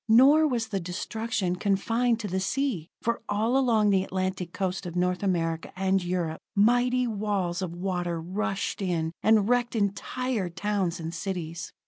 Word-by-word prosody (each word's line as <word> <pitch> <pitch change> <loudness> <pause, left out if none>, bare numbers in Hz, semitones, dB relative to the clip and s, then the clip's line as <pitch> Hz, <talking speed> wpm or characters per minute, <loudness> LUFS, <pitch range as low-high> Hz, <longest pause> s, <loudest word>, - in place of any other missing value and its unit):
Nor 280 +7 +7
was 235 -5 -1
the 200 -3 -1
destruction 190 +2 -2
confined 225 +5 +1
to 210 - -3
the 190 0 -1
sea, 210 - -1
for 235 0 0
all 220 +4 +1
along 225 -6 +3
the 190 -1 +3
Atlantic 185 -2 -3
coast 190 0 -2
of 170 - -7
North 180 0 +1
America 165 -4 -1
and 190 0 +1
Europe, 175 -3 -2 0.2
mighty 245 +4 +3
walls 200 -5 -1
of 175 -2 -4
water 175 -2 -2
rushed 195 +5 -2
in, 170 -4 0
and 215 -2 +4
wrecked 245 0 +1
entire 210 +1 -1
towns 185 -1 -1
and 165 0 -5
cities. 170 -2 -4
195 Hz, 155 wpm, -27 LUFS, 180-225 Hz, 0.2 s, Nor